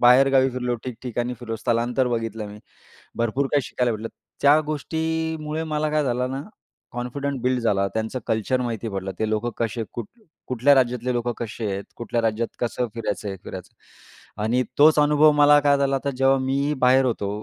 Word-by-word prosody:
बाहेरगावी 130 +2 +5
फिरलो, 125 -1 -2
ठिकठिकाणी 125 0 -4
फिरलो. 115 -2 -4
स्थलांतर 120 +2 0
बघितलं 115 -2 -3
मी. 105 +1 -10 0.6
भरपूर 120 +4 0
काही 145 -2 +3
शिकायला 125 -1 -1
भेटलं. 110 +1 -5 0.3
त्या 145 +2 +6
गोष्टीमुळे 160 +1 -2
मला 155 -1 -1
काय 150 -1 +1
झालं 125 0 -1
ना, 135 +1 -4 0.5
कॉन्फिडंट 130 +3 -3
बिल्ड 125 0 +1
झाला. 100 -4 +1
त्यांचं 110 +3 -2
कल्चर 110 +4 0
माहिती 115 -2 -3
पडलं. 95 -1 -4
ते 110 - 0
लोकं 110 +2 -1
कसे, 115 0 -1
कुठ 120 -3 -5 0.4
कुठल्या 130 +3 +4
राज्यातले 125 -1 +1
लोक 120 0 -1
कसे 110 0 -4
आहेत, 100 +1 -4
कुठल्या 120 0 -2
राज्यात 115 +1 0
कसं 120 +1 -1
फिरायचं, 110 -2 -3
हे 95 - -4
फिरायचं 95 -2 -9 0.7
आणि 120 +4 +2 0.2
तोच 150 +1 +6
अनुभव 150 +1 +5
मला 145 0 +6
काय 145 0 +4
झाला 135 -1 +1
तर 140 - +1
जेव्हा 135 +1 +4
मी 140 +3 0
बाहेर 130 +1 +5
होतो 115 -5 -1
125 Hz, 170 wpm, -23 LUFS, 115-140 Hz, 0.7 s, त्या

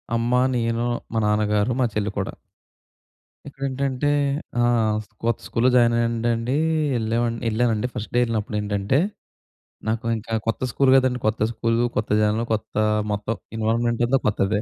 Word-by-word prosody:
అమ్మ, 115 +1 0 0.2
నేను, 115 0 0 0.3
మా 115 - +1
నాన్నగారు, 105 +2 +1
మా - - +4
చెల్లి 105 -1 0
కూడా. 95 - -3 1.1
ఇక్కడ 140 -1 -13
ఏంటంటే 135 +1 -1 0.5
ఆ! - - +3 0.6
కొత్త 115 -1 +1
స్కూల్లో 120 +2 +2
జాయిన్ 120 -1 +5
అయ్యానండి. 115 +1 0 0.4
వెళ్ళా 115 0 0 0.3
వెళ్ళానండి. 115 0 +1
ఫస్ట్ 110 -3 -6
డే - - +5
వెళ్ళినప్పుడు 110 -2 -2
ఏంటంటే, 105 +5 0 0.9
నాకు 115 +1 -2
ఇంకా 110 +1 -7
కొత్త 115 - -1
స్కూల్ 135 -2 +3
కదండీ. 130 -1 +3
కొత్త 110 0 -1
స్కూల్ 115 +1 0 0.2
కొత్త 105 - -1
జనలు 110 +2 +1
కొత్త 110 - -4 0.4
మొత్తం 105 +2 -2 0.2
ఇన్వాల్వ్మెంట్ 115 +2 +1
అంతా 135 +2 +3
కొత్తదే. 105 0 +1
115 Hz, 140 wpm, -23 LUFS, 105-120 Hz, 1.1 s, జాయిన్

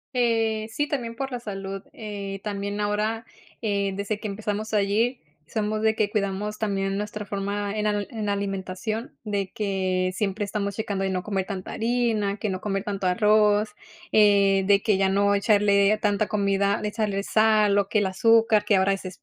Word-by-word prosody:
Eh, 225 -2 +1
sí, 290 +5 -1
también 235 -5 -3
por 270 +1 -4
la 245 - -3
salud, 195 -3 -6
eh, 200 -2 -6
también 200 0 -3
ahora, 215 +2 -1 0.4
eh, 200 -2 0
desde 200 +1 -3
que 215 - -4
empezamos 210 +1 -3
allí 215 +5 +1 0.3
somos 215 0 -2
de 220 0 +3
que 210 -2 +1
cuidamos 210 +1 -2
también 195 -2 -1
nuestra 210 0 -4
forma 200 +1 -3
en 210 - -1
al 205 -1 0
en 215 -3 -3
alimentación 200 +3 -3
de 200 -3 -2
que 185 -3 -1
siempre 205 +1 -1
estamos 200 -1 -3
checando 200 -3 -2
de 190 - 0
no 185 -1 -1
comer 195 -3 -2
tanta 190 -2 -6
harina, 225 -3 0
que 210 0 -2
no 185 -1 -3
comer 195 -1 -2
tanto 195 -2 -2
arroz, 210 +2 +3 0.4
eh, 200 -2 +5
de 200 -1 +5
que 215 -4 +2
ya 195 0 +2
no 200 +1 +3
echarle 200 0 +3
tanta 205 0 +1
comida 200 -1 +1
de 210 - -2
echarle 210 -2 -1
sal 215 -2 +3
o 200 -1 +1
que - - +1
el 205 - +1
azúcar, 220 +2 +4
que 205 - +4
ahora 195 +1 +3
es 195 - -4
Splenda 185 - -6
205 Hz, 185 wpm, -25 LUFS, 195-215 Hz, 0.4 s, eh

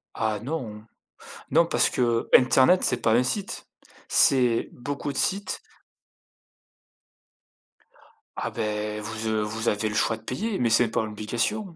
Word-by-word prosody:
Ah 110 -2 -1
non! 115 -7 -5 0.7
Non 165 +5 +5
parce - - +2
qu'internet 125 +7 +3
c'est 125 - +2
pas 110 - +1
un 125 - +4
site, 195 +10 -3 0.4
c'est 125 -6 +3
beaucoup 140 +3 -5
de - - -9
sites. 195 0 -1 2.8
Ah - - -4
beh, 105 0 -3
vous 110 +1 -5
heu, 110 -1 0
vous 110 +2 -2
avez 105 +1 -1
le 105 - -5
choix 115 - +1
de - - -18
payer, 200 - -3
mais 120 -2 +1
c'est 115 +1 +4
pas 110 - -1
l'obligation. 120 - -3
115 Hz, 140 wpm, -25 LUFS, 110-140 Hz, 2.8 s, Non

